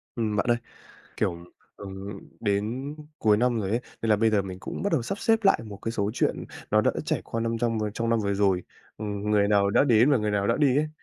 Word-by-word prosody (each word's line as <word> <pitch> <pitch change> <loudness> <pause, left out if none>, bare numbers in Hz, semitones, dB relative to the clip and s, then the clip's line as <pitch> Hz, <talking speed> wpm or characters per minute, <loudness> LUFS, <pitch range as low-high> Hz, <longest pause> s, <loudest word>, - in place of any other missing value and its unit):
Ừm, 110 -3 -1
bạn 105 - +1
ơi, 120 - +4 0.6
kiểu, 85 - 0 0.4
ừm, 100 0 -7 0.2
đến 115 +7 -1 0.2
cuối 105 -2 +4
năm 120 0 +1
rồi 95 - -2
ấy, 115 +3 +1 0.2
nên 115 - 0
là 105 - +5
bây 110 +1 +3
giờ 105 -2 +2
mình 95 -1 -7
cũng - - -6
bắt 200 - -1
đầu - - +2
sắp 195 - -4
xếp 225 +1 +3
lại 195 - +5
một 105 -2 -8
cái 115 - -2
số 100 -2 -1
chuyện - - 0 0.3
nó - - +5
đã - - +3
trải - - -1
qua 115 - -3
năm 115 0 -1
trong 115 -1 0
vừa 105 -1 -1
trong 115 +2 -3
năm 115 - +3
vừa 100 -1 0
rồi. 95 -2 +2 0.3
Ừm, 105 -1 -3
người 100 -1 +3
nào 100 -1 +3
đã 120 - +4
đến 120 0 +5
và 140 - +4
người 105 -1 -1
nào 100 -1 0
đã 115 - +2
đi 140 -4 +3
ấy. 155 +1 0
110 Hz, 255 wpm, -26 LUFS, 100-120 Hz, 0.6 s, là